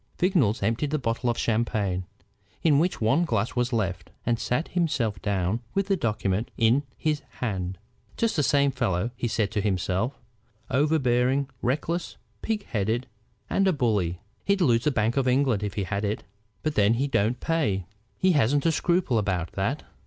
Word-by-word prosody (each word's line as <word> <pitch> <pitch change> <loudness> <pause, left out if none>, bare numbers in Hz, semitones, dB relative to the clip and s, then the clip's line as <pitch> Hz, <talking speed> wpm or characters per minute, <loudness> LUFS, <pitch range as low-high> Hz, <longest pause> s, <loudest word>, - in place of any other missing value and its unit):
Vignolles 140 - +2
emptied 115 +8 0
the 155 - 0
bottle 120 -2 -1
of 120 - 0
champagne, 105 -5 0 0.6
in 150 -4 +5
which 175 +4 +1
one 125 +10 +3
glass 115 -8 -1
was 125 0 +1
left, 100 -6 -1 0.2
and 120 -1 +1
sat 135 +7 -1
himself 130 - 0
down 100 +1 0 0.2
with 195 0 +2
the 195 - +4
document 105 - -1
in 115 +5 +4 0.2
his 150 -2 0
hand. 95 -6 -3 0.4
"Just 230 -1 +1
the 155 - +2
same 140 0 +3
fellow," 120 -4 -1
he 120 - -2
said 110 -2 0
to 105 - 0
himself; 95 +5 -1 0.5
"overbearing, 135 -2 +2
reckless, 155 +7 -1 0.2
pig 220 -2 -2
headed, 110 +3 -1 0.4
and 195 0 +2
a 190 - +4
bully. 105 - 0 0.2
He'd 200 0 +2
lose 120 -5 +3
the - - +5
Bank 115 0 0
of 135 -1 +2
England 125 -4 +2
if 100 -3 -3
he 100 - -1
had 100 +3 -2
it. 105 +1 -2 0.4
But 155 - 0
then 105 -3 +4
he 130 +4 +1
don't 120 -2 +1
pay! 125 - 0 0.3
He 185 - +3
hasn't 145 -1 +2
a 165 - +4
scruple 170 -7 +1
about 90 -5 -1
that. 120 +10 -2
120 Hz, 175 wpm, -26 LUFS, 105-145 Hz, 0.6 s, in